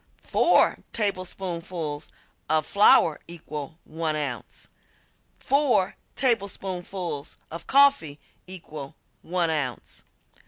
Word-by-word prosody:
Four -, -, +3 dB
tablespoonfuls 180 Hz, -6 st, -2 dB, 0.4 s
of 155 Hz, 0 st, +2 dB
flour 185 Hz, -6 st, +5 dB
equal 155 Hz, -2 st, -7 dB
1 160 Hz, -1 st, -2 dB
ounce. 135 Hz, -7 st, -5 dB, 0.7 s
Four 265 Hz, -9 st, +2 dB, 0.2 s
tablespoonfuls 190 Hz, -, -2 dB
of 165 Hz, +1 st, -8 dB
coffee 275 Hz, -, +4 dB, 0.3 s
equal 155 Hz, -6 st, -8 dB, 0.3 s
1 170 Hz, -1 st, 0 dB
ounce. 140 Hz, -6 st, -4 dB
170 Hz, 80 wpm, -25 LUFS, 155-195 Hz, 0.7 s, flour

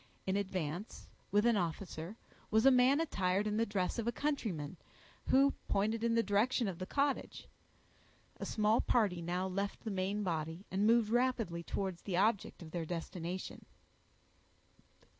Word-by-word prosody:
In 190 Hz, -, 0 dB
advance, 185 Hz, -1 st, -3 dB, 0.2 s
with 205 Hz, +3 st, +3 dB
an 235 Hz, -1 st, +5 dB
officer, 175 Hz, +2 st, -4 dB, 0.3 s
was 220 Hz, +2 st, +3 dB
a 270 Hz, -, +9 dB
man 255 Hz, +3 st, +5 dB
attired 200 Hz, -, 0 dB
in 210 Hz, 0 st, 0 dB
the 230 Hz, +1 st, +2 dB
dress 200 Hz, +2 st, -1 dB
of 230 Hz, -, -2 dB
a -, -, +3 dB
countryman, 215 Hz, -, -2 dB, 0.5 s
who 275 Hz, +1 st, +5 dB
pointed 220 Hz, +3 st, 0 dB
in 230 Hz, 0 st, +2 dB
the 230 Hz, -, +3 dB
direction 215 Hz, +4 st, +2 dB
of 185 Hz, -3 st, -4 dB
the 185 Hz, -, -4 dB
cottage. 280 Hz, +2 st, -1 dB, 0.9 s
A -, -, -5 dB
small 215 Hz, +1 st, +2 dB
party 200 Hz, -8 st, +2 dB
now 175 Hz, +2 st, -1 dB
left 195 Hz, +2 st, -3 dB
the 220 Hz, -, -3 dB
main 195 Hz, +2 st, -1 dB
body, 165 Hz, +1 st, -3 dB
and 200 Hz, +3 st, +2 dB
moved 230 Hz, -1 st, +4 dB
rapidly 240 Hz, -8 st, +1 dB
towards 185 Hz, 0 st, -3 dB
the 185 Hz, -4 st, -2 dB
object 205 Hz, -2 st, +1 dB
of 160 Hz, -, -10 dB
their 170 Hz, -1 st, -2 dB
destination. 175 Hz, +2 st, -5 dB
200 Hz, 160 wpm, -34 LUFS, 180-230 Hz, 0.9 s, a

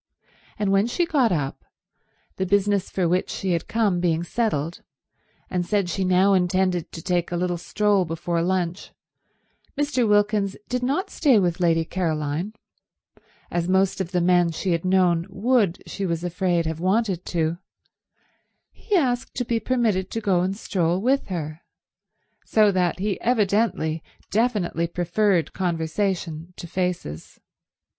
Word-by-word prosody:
And 205 Hz, -2 st, 0 dB
when 195 Hz, +3 st, +3 dB
she 345 Hz, +8 st, 0 dB
got 275 Hz, -8 st, +2 dB
up, 145 Hz, -5 st, -2 dB, 0.7 s
the 190 Hz, -, 0 dB
business 200 Hz, 0 st, +2 dB
for 185 Hz, -3 st, 0 dB
which 180 Hz, +2 st, 0 dB
she 190 Hz, -, -2 dB
had 170 Hz, -1 st, -1 dB
come 210 Hz, -6 st, +1 dB
being 170 Hz, -2 st, +1 dB
settled, 175 Hz, -5 st, -2 dB, 0.7 s
and 180 Hz, -1 st, -1 dB
said 200 Hz, 0 st, 0 dB
she 190 Hz, -, -1 dB
now 185 Hz, +2 st, +4 dB
intended 185 Hz, -1 st, +1 dB
to 165 Hz, -, -7 dB
take 175 Hz, -2 st, 0 dB
a 175 Hz, -, -1 dB
little 175 Hz, -1 st, -1 dB
stroll 205 Hz, +1 st, +1 dB
before 165 Hz, 0 st, -2 dB
lunch, 180 Hz, 0 st, -1 dB, 0.9 s
Mr. 265 Hz, -6 st, +1 dB
Wilkins 205 Hz, -1 st, +2 dB
did 250 Hz, 0 st, -2 dB
not 290 Hz, +11 st, -1 dB
stay 280 Hz, -8 st, +4 dB
with 175 Hz, -4 st, +1 dB
Lady 165 Hz, -2 st, +2 dB
Caroline, 160 Hz, +1 st, -2 dB, 1.0 s
as 175 Hz, 0 st, -1 dB
most 190 Hz, +1 st, +2 dB
of 180 Hz, -, -3 dB
the 180 Hz, -1 st, 0 dB
men 175 Hz, -1 st, +4 dB
she 170 Hz, +3 st, -2 dB
had 165 Hz, -1 st, 0 dB
known 180 Hz, -2 st, +2 dB
would, 210 Hz, -4 st, +1 dB
she 195 Hz, -2 st, -4 dB
was 170 Hz, 0 st, -2 dB
afraid, 175 Hz, -1 st, 0 dB
have 160 Hz, 0 st, -3 dB
wanted 190 Hz, 0 st, +1 dB
to—he 170 Hz, -, -6 dB
asked 255 Hz, -7 st, 0 dB
to 245 Hz, -, -1 dB
be 230 Hz, 0 st, 0 dB
permitted 220 Hz, -6 st, 0 dB
to 225 Hz, -, -3 dB
go 195 Hz, -5 st, +2 dB
and 190 Hz, +2 st, -1 dB
stroll 180 Hz, -4 st, 0 dB
with 265 Hz, +6 st, +1 dB
her; 160 Hz, -3 st, -5 dB, 0.8 s
so 215 Hz, -2 st, +4 dB
that 180 Hz, -2 st, +1 dB
he 200 Hz, 0 st, -2 dB
evidently 205 Hz, -8 st, +1 dB, 0.3 s
definitely 205 Hz, -7 st, +1 dB
preferred 175 Hz, +1 st, +1 dB
conversation 170 Hz, -1 st, -2 dB
to -, -, -7 dB
faces. 175 Hz, -, -4 dB
185 Hz, 145 wpm, -24 LUFS, 170-210 Hz, 1.0 s, now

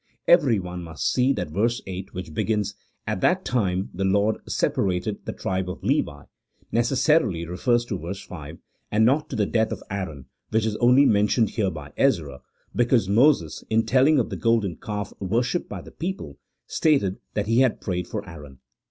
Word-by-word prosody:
Every 145 Hz, -10 st, +5 dB
one 90 Hz, -1 st, -5 dB
must 80 Hz, -1 st, -2 dB
see 130 Hz, +1 st, +3 dB
that 90 Hz, -, -4 dB
verse 115 Hz, +8 st, +1 dB
8, 95 Hz, 0 st, -6 dB
which 90 Hz, -4 st, -7 dB
begins, 105 Hz, +3 st, 0 dB, 0.2 s
" -, -, -48 dB
At 95 Hz, -, -2 dB
that 185 Hz, +1 st, +2 dB
time 95 Hz, -6 st, 0 dB
the 95 Hz, -, -3 dB
Lord 100 Hz, +3 st, +2 dB
separated 95 Hz, +2 st, -1 dB
the -, -, -1 dB
tribe 95 Hz, -1 st, -2 dB
of 90 Hz, -, -7 dB
Levi," 75 Hz, -1 st, 0 dB, 0.5 s
necessarily 120 Hz, -, +2 dB
refers 120 Hz, +8 st, +1 dB
to 100 Hz, -6 st, -4 dB
verse 90 Hz, +4 st, -5 dB
5, 80 Hz, -2 st, -9 dB, 0.3 s
and 110 Hz, +1 st, +4 dB
not 140 Hz, +5 st, +2 dB
to -, -, -4 dB
the 105 Hz, -3 st, +2 dB
death 110 Hz, +1 st, +1 dB
of -, -, -5 dB
Aaron, 80 Hz, -9 st, -5 dB, 0.2 s
which 110 Hz, 0 st, +1 dB
is 110 Hz, -1 st, -1 dB
only 125 Hz, +3 st, +5 dB
men 105 Hz, -3 st, +4 dB
tioned 110 Hz, 0 st, +2 dB
here 105 Hz, -4 st, 0 dB
by 75 Hz, -4 st, -9 dB
Ezra 65 Hz, -, +1 dB, 0.3 s
because 120 Hz, -3 st, +3 dB
Moses, 100 Hz, -, +3 dB
in 110 Hz, 0 st, +2 dB
telling 135 Hz, +4 st, +4 dB
of 125 Hz, -, 0 dB
the -, -, -3 dB
golden 115 Hz, -6 st, +1 dB
calf 105 Hz, -3 st, -5 dB
worshipped 120 Hz, -, -1 dB
by -, -, -6 dB
the -, -, -13 dB
people, 165 Hz, -, -5 dB, 0.3 s
stated 135 Hz, -, +1 dB, 0.2 s
that 105 Hz, -, 0 dB
he 115 Hz, +3 st, +2 dB
had 130 Hz, -3 st, +3 dB
prayed 90 Hz, -3 st, -3 dB
for 105 Hz, -2 st, -5 dB
Aaron. 75 Hz, -6 st, -11 dB
105 Hz, 185 wpm, -24 LUFS, 90-120 Hz, 0.5 s, Every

